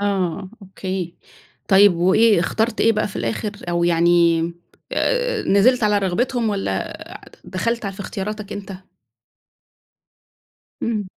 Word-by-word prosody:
آه 190 -2 -1
أوكي، 185 -2 -5 0.5
طيب 195 -1 +6
وإيه، 200 +3 +4
اخترت 220 +7 -1
إيه 225 - +4
بقى 215 -1 -1
في - - -8
الآخِر؟ 120 - -2 0.2
أو 170 0 +1
يعني 170 -1 +3 0.5
آآ - - 0
نزلت 240 +6 +3
على 210 -1 +3
رغبتهُم، 230 +5 0
والّا 195 - -2 0.3
آآ - - -16
دخَلت 230 +4 -2
ع 200 - -2
في 190 - -15
اختياراتك 205 +1 -5
أنتَ؟ 200 0 -7 2.1
امم. 215 -3 -1
200 Hz, 125 wpm, -21 LUFS, 175-220 Hz, 2.1 s, طيب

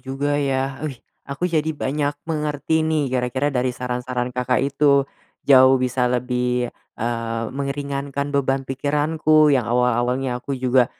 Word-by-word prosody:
juga 140 +2 -2
ya. 135 -1 -1
Wih, 135 -4 -5 0.3
aku 140 +5 -3
jadi 160 -1 +1
banyak 145 +1 -1
mengerti 150 0 -1
nih 150 -5 0
gara-gara 130 +3 0
dari 125 -1 0
saran-saran 125 0 -3
Kakak 125 0 0
itu. 140 0 +3 0.4
Jauh 130 -1 +7
bisa 125 -1 0
lebih, 125 0 0 0.3
eee, 115 0 -2
meringankan 140 0 -3
beban 135 -1 0
pikiranku 150 +3 +2
yang 130 -5 +2
awal-awalnya 125 +1 +1
aku 140 +2 -4
juga, 125 -1 +3
135 Hz, 130 wpm, -22 LUFS, 125-145 Hz, 0.4 s, Jauh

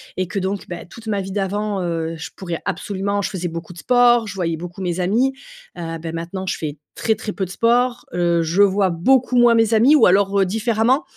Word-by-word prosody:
et 185 -1 -2
que 195 +3 -3
donc, 195 +1 -3
bah, 175 -1 -6
toute 225 +5 -13
ma 205 -2 0
vie 190 0 -7
d'avant, 205 0 -2
heu, 165 -1 -2
je 160 0 -7
pourrais 175 -3 -5
absolument 200 +2 -2
je - - -2
faisais 180 -2 -3
beaucoup 165 +1 -7
de 170 - -12
sport, 240 0 +4
je 205 - -6
voyais 170 -3 -1
beaucoup 175 +3 -8
mes 180 0 -2
amis, 235 +9 +1 0.4
heu, 165 -1 -5
bah, 165 0 -5
maintenant 170 +3 -5
je - - -1
fais 155 -2 -5 0.2
très, 220 - +1
très 210 -1 -6
peu 195 - -3
de 185 - -4
sport, 240 +4 +1
heu, 175 -1 +2
je 165 +4 +1
vois 195 -1 +3
beaucoup 250 +10 +2
moins 240 -1 +6
mes 225 -1 +3
amis, 240 +7 +6
ou - - +6
alors, 200 +2 +3
heu, 195 - +4
différemment. 225 - +1
195 Hz, 230 wpm, -20 LUFS, 175-225 Hz, 0.4 s, moins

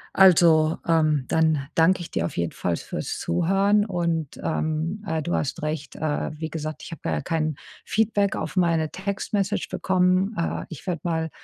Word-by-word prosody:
also, 165 -4 +6
ähm, 155 -4 +3
dann 160 -4 +2
danke 180 +3 +4
ich 170 - -8
dir 85 - 0
auf - - -5
jeden 85 -1 0
Fall 85 -2 -1
fürs - - -5
Zuhören 195 - +2
und, 170 -6 -2
ähm 160 +6 -1
äh, 160 -3 -1
du 170 +3 -3
hast 140 - -2
recht, 155 -2 -4
äh, 150 -1 -1
wie 160 0 -3
gesagt, 155 0 -5
ich - - -9
habe 165 - -8
da - - -1
ja 75 - 0
kein 155 - -1 0.3
Feedback 205 -2 +1
auf - - -4
meine 165 -4 +2
Text-Message 200 +1 -2
bekommen. 185 +2 +2
Äh, 170 - -2
ich 165 +2 -10
werde 170 -4 -2
mal, 160 -2 -1
165 Hz, 180 wpm, -24 LUFS, 155-185 Hz, 0.3 s, also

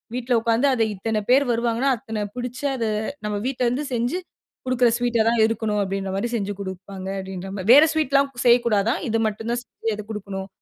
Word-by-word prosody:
வீட்ல 250 0 -1
உட்கார்ந்து 230 +4 +2
அத 230 -3 +2
இத்தனை 215 +2 -1
பேர் 270 +3 +5
வருவாங்கன்னா 235 +3 +1
அத்தன 220 -3 -4
புடிச்சு 250 +2 -5
அத 235 -3 -2 0.4
நம்ம 210 -1 -1
வீட்ல 255 -1 -1
இருந்து 255 +5 -1
செஞ்சி 245 +9 0 0.5
கொடுக்குற 250 -1 +3
ஸ்வீட்டா 240 -2 +2
தான் 230 -1 +2
இருக்கணும் 220 -2 -1
அப்படின்ற 195 0 -3
மாரி 235 +5 -1
செஞ்சி 205 -1 -3
கொடுப்பாங்க. 190 0 -7
அப்படின்ற 190 0 -7
மாரி 190 +2 -4
வேற 290 +4 +9
ஸ்வீட்லாம் 280 -3 +2
செய்யக்கூடாதாம். 235 - +3
இது 225 +1 +1
மட்டும் 220 +2 -4
தான் 240 - -2
செஞ்சு 225 -1 -4
அத 215 - -6
கொடுக்கணும். 195 -2 -5
230 Hz, 180 wpm, -23 LUFS, 205-250 Hz, 0.5 s, வேற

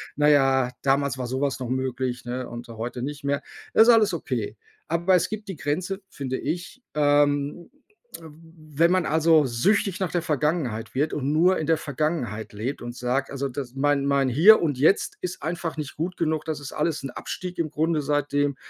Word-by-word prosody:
„Na 150 0 +3
ja, 135 -3 +3
damals 140 0 +1
war 125 - -3
so 130 +1 -3
was 140 -2 0
noch 125 - -4
möglich, 130 -1 -2
ne, 125 +1 -4
und 120 0 -8
heute 120 +2 -5
nicht 145 +1 -5
mehr.“ 140 0 0 0.3
Ist 225 +2 +7
alles 225 -3 +6
okay, - - -3 0.3
aber 170 +3 +1
es 175 - +1
gibt 210 -1 -6
die 190 - -4
Grenze, 175 +8 -2
finde 130 -2 -4
ich, 175 - -4
ähm, 145 +2 +2 0.5
wenn 160 0 -2
man, 185 -2 +2
also, 160 -1 +4
süchtig 195 - +1
nach 185 -3 -1
der 175 - 0
Vergangenheit 150 -8 -1
wird 150 +4 0
und 140 0 -1
nur 175 +4 +4
in 155 - -2
der 165 -1 +3
Vergangenheit 140 -8 -3
lebt 120 +7 -4
und 120 0 -6
sagt: 125 +3 -1
„Also, 140 0 -3
das 125 -1 -6
mein 140 0 +1
mein 140 -1 +2
Hier 175 - +7
und 145 -6 0
Jetzt 195 - +2
ist 365 - -5
einfach 165 0 -3
nicht 150 -3 -5
gut 175 +4 -3
genug. 160 -2 -1
Das 155 -2 -3
ist 145 - -8
alles 155 0 -1
'n 135 - -4
Abstieg 180 +7 -6
im 155 -3 -1
Grunde 160 0 0
seitdem 145 -1 0
145 Hz, 195 wpm, -25 LUFS, 130-165 Hz, 0.5 s, Ist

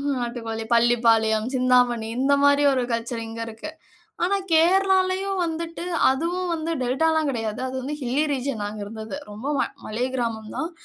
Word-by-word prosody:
ம்ஹ்ம் 280 -1 -1
நாட்டுக்கோழி, 230 -2 -4
பள்ளிப்பாளையம், 225 -2 +3
சிந்தாமணி 250 -3 +3
இந்த 270 +2 +2
மாரி 285 0 +5
ஒரு 255 -1 +1
கல்ச்சர் 230 0 -2
இங்க 225 0 -8
இருக்கு. 225 +8 -7 0.5
ஆனா 400 +3 +2 0.2
கேரளாலயும் 375 +3 +3
வந்துட்டு, 330 +1 -4 0.3
அதுவும் 345 +6 -1
வந்து 325 0 -3
டெல்டாலாம் 310 +4 +1
கிடையாது. 225 -3 -3
அது 255 - -7
வந்து 295 +3 -4
ஹில்லி 265 +4 0
ரீஜியன் 260 -4 -2
நாங்க 210 +1 -5
இருந்தது. 220 +4 -7
ரொம்ப 210 +6 -8
ம - - +3 0.2
மலை 235 +4 -1
கிராமம் 225 -3 -3
தான். 325 - -2
255 Hz, 155 wpm, -24 LUFS, 225-320 Hz, 0.5 s, மாரி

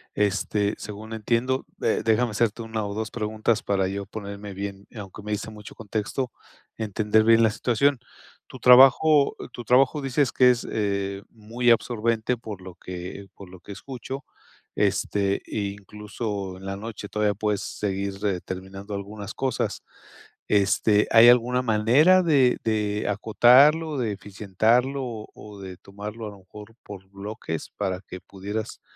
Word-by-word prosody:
Este, 105 0 0
según 105 +1 -8
entiendo, 120 +4 0 0.2
eh, - - +1
déjame 115 +1 +2
hacerte 115 +1 0
una 110 -1 -3
o 100 - -4
dos 110 0 -4
preguntas 110 0 -1
para 95 -2 0
yo 100 +1 -4
ponerme 100 -1 -7
bien, 100 0 -6
aunque 105 -1 -9
me 105 - -5
diste 105 +1 -3
mucho 105 -1 -12
contexto, 110 +4 -3 0.4
entender 110 0 +1
bien 115 +1 +5
la 110 - +4
situación. 130 +5 +1 0.5
Tu - - -11
trabajo 135 +4 +6 0.2
tu 120 - -7
trabajo 135 +5 +3
dices 135 -1 +1
que 125 -1 +5
es, 125 -1 +1
eh, 100 -2 -2
muy 115 +3 -2
absorbente, 115 0 +1
por 110 -5 -9
lo 90 -1 -10
que 90 +2 -8
por 100 - -12
lo 90 0 -13
que 90 - -12
escucho, 130 +5 -7 0.5
este, 100 -1 0
incluso 100 -1 -5
en 95 - -12
la 95 0 -4
noche, 105 -1 -7
todavía 105 -1 +1
puedes 105 0 -1
seguir, 100 -1 -3
eh, 95 -3 0
terminando 95 +2 -7
algunas 100 +1 -7
cosas. 135 -1 -2 0.6
Este, 105 +1 +3
¿hay 115 +1 +8
alguna 125 +1 +4
manera 125 +11 +4
de 140 -7 +3
de 105 -2 -1
acotarlo, 130 - +4
de 115 -5 -1
eficientarlo 110 +7 0
o 115 -4 -7
o 105 -1 -12
de 95 -1 -8
tomarlo 105 +4 -8
a - - -7
lo 100 - -14
mejor 105 +4 -13
por 95 -2 -11
bloques 100 -4 -6
para 95 -2 -2
que 90 -1 -10
pudieras 100 +3 -6
105 Hz, 150 wpm, -25 LUFS, 100-120 Hz, 0.6 s, hay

